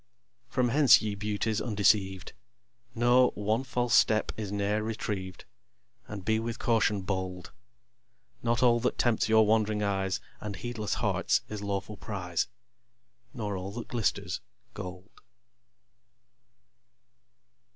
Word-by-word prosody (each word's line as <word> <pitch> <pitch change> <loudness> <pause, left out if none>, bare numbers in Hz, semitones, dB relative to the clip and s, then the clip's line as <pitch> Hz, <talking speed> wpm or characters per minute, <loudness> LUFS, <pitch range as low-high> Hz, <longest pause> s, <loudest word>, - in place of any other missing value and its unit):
From 125 -2 +1
hence, 140 -3 +6
ye 105 -1 -1
Beauties 105 +2 -1
undeceived, 100 -4 +1 0.6
Know, 120 +2 +5
one 110 +4 0
false 125 -2 -1
step 110 -1 +4
is 105 -3 -5
ne'er 100 +1 0
retrieved, 100 -4 -4 0.6
And 100 -3 -7
be 110 0 +2
with 115 0 -4
caution 105 -4 +1
bold. 95 -1 -4 0.9
Not 115 +1 +1
all 120 -1 +5
that 125 +2 -1
tempts 115 -2 +1
your 110 0 +6
wand'ring 110 -1 +2
eyes 95 -2 0 0.2
And 105 -2 -5
heedless 115 -4 -3
hearts, - - +1
is 105 -1 -5
lawful 100 +1 -3
prize; 90 -5 -2 0.8
Nor 105 -3 -4
all 95 +1 -5
that 120 0 -7
glisters, 115 -3 -1 0.3
gold. 90 +2 -9
105 Hz, 120 wpm, -29 LUFS, 100-115 Hz, 0.9 s, hence